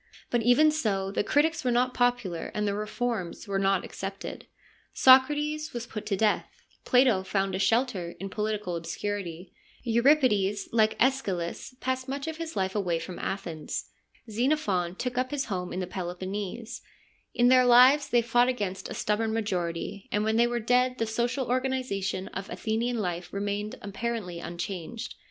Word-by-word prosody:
But 240 - +2
even 245 +7 +5
so 200 -10 -1
the 205 - 0
critics 300 +8 +2
were 255 - +1
not 250 +1 +2
popular 245 -8 0
and 210 0 0
their 200 - 0
reforms 215 -2 -3
were 195 -1 0
not 195 -1 +2
accepted: 195 0 -7 0.5
Socrates 295 +4 +4
was 240 -1 -4
put 220 -3 -7
to 195 - 0
death; 215 +1 +2 0.4
Plato 250 -6 +4
found 195 0 -1
a 190 - -1
shelter 200 -6 +1
in 195 +1 -6
political 210 -4 -2
obscurity; 175 +1 -5 0.3
Euripides, 235 -5 +3
like 220 -1 +3
ZEschylus, 230 -5 -1
passed 260 0 -2
much 275 +1 -3
of 320 -1 -4
his 330 -1 -6
life 190 -1 0
away 180 -5 0
from 175 +2 -7
Athens; 160 - -4 0.4
Xenophon 215 - 0
took 250 +3 -2
up 255 0 0
his 290 -2 -2
home 180 -4 -3
in 185 - -3
the - - -2
Peloponnese: 185 +4 -5 0.5
in 245 0 +5
their 255 0 +6
lives 255 +4 +6
they 240 -1 +3
fought 240 +2 +3
against 195 -6 -3
a - - -5
stubborn 220 +1 0
majority, 190 -3 -3
and 210 +1 +1
when 220 +1 +1
they 235 +1 +4
were 240 0 -1
dead 250 +2 +2
the 225 - 0
social 240 +4 -1
organisation 250 -7 -1
of 190 +1 -6
Athenian 230 +2 -1
life 175 -4 -3
remained 205 +1 -3
apparently 200 -3 -4
unchanged. 175 +5 -5
215 Hz, 160 wpm, -28 LUFS, 190-250 Hz, 0.5 s, their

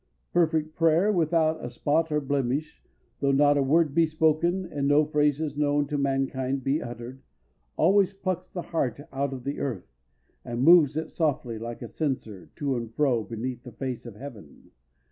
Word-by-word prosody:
Perfect 160 -2 +1
prayer, 165 +5 +3
without 160 -3 +1
a - - -4
spot 155 +5 0
or 150 - +2
blemish, 140 +1 -2 0.4
though 140 -1 +2
not 145 +1 +4
a 145 - +2
word 150 +2 +3
be 165 +1 +4
spoken 160 +4 +1
and 145 -5 -2
no 145 +1 +4
phrases 150 0 0
known 145 0 +1
to 145 +1 -4
mankind 135 -1 -1
be 140 +5 0
uttered, 120 +2 -8 0.6
always 195 +3 +4
plucks 185 -2 -4
the 175 - -5
heart 140 -7 -2
out 140 0 -1
of 130 -2 -7
the 140 +2 -4
earth, 115 - -4 0.5
and 120 +1 -3
moves 155 -2 +6
it 160 - -3
softly, 130 -8 -1
like 115 +1 -6
a - - -5
censer, 125 - -4
to 140 -3 -1
and 115 -2 -5
fro 130 -7 +2
beneath 120 +4 -5
the 125 - -11
face 125 0 -5
of 115 - -9
heaven. 105 - -12
145 Hz, 175 wpm, -26 LUFS, 130-160 Hz, 0.6 s, moves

